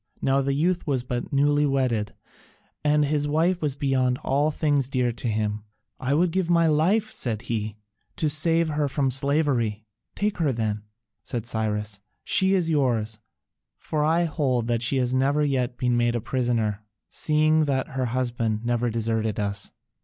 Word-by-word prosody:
Now 135 +1 +2
the 135 0 0
youth 175 +4 0
was 135 -4 0
but 125 -1 -4
newly 145 +1 +3
wedded, 130 -7 0 0.7
and 150 0 +3
his 145 0 0
wife 170 +5 +1
was 145 -3 -1
beyond 130 -3 +1
all 145 +3 +2
things 145 -3 0
dear 125 -3 +1
to 115 +1 -5
him. 105 -1 -1 0.4
"I 130 +2 0
would 170 +2 +2
give 185 -1 -1
my 170 -1 +4
life," 175 +8 +2
said 115 -3 -3
he, 110 -3 -3 0.4
"to 155 - 0
save 165 +2 +3
her 150 -1 0
from 135 -1 0
slavery." 130 -6 0 0.3
"Take 205 -2 -1
her 155 -5 +2
then," 110 -3 -2 0.4
said 120 -2 -4
Cyrus, 105 -2 -2 0.2
"she 190 +1 +3
is 180 -3 +1
yours. 120 -8 0 0.6
For 150 -1 -2
I 165 +3 +3
hold 135 -7 0
that 120 -1 0
she 125 +3 +1
has 125 -1 0
never 140 +3 +2
yet 130 -4 -1
been 125 -1 +1
made 120 0 +1
a - - 0
prisoner, 115 -4 -1 0.3
seeing 155 0 +2
that 135 +1 -1
her 135 -2 -2
husband 120 -3 -1
never 120 0 +1
deserted 110 -2 -1
us. 100 -1 0
130 Hz, 170 wpm, -25 LUFS, 115-150 Hz, 0.7 s, my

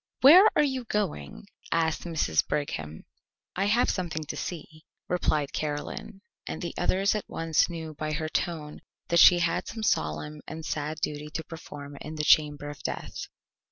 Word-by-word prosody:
"Where 350 +10 +9
are - - +5
you 265 -4 -1
going?" 190 - -3 0.3
asked 165 0 +1
Mrs. 160 - +1
Brigham. 80 - -3 0.5
"I 195 - +1
have 230 +4 +3
something 165 -4 -2
to - - -3
see 170 -4 -4
to," 155 -1 -18 0.3
replied 155 -5 0
Caroline, 150 +6 -4 0.3
and - - -4
the 170 -2 -4
others 190 +3 +2
at 215 - -4
once 165 +1 +1
knew 160 -2 -6
by 155 +1 -3
her 155 +1 -2
tone 155 -2 -3 0.3
that 170 - +4
she 175 - +9
had 175 -1 0
some 225 -1 -6
solemn 150 - -1
and 160 0 -7
sad 150 0 -3
duty 150 -3 -3
to 160 - -2
perform 145 -4 -9
in 155 +1 -7
the 150 - -2
chamber 150 -1 +4
of 145 - -12
death. - - -5
160 Hz, 170 wpm, -28 LUFS, 150-180 Hz, 0.5 s, Where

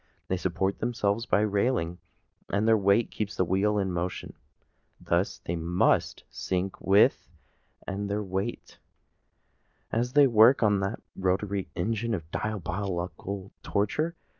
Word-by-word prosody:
They 95 - +1
support 95 +2 -1
themselves 115 -2 -1
by 105 - +3
a 105 - +2
railing, 100 -5 0 0.5
and 105 +2 +1
their 115 - +6
weight 100 +2 +2
keeps 105 -1 -4
the 95 - +1
wheel 100 +4 +1
in 95 -2 0
motion. 90 +1 -4 0.7
Thus - - -1
they 85 - -2
must 85 +2 +1
sink 95 +1 -3
with 100 +2 +4 0.6
all 100 +1 -3
their 105 +1 -2
weight, 95 +4 -4 1.1
as 120 +2 -1
they 145 -1 +7
work 115 +1 +6
on 105 -2 +3
that 95 +3 -3
rotatory 95 +1 -1
engine 115 +4 -1
of 80 -3 -8
diabolical 95 -1 -4
torture. 150 +12 -1
100 Hz, 135 wpm, -28 LUFS, 95-110 Hz, 1.1 s, they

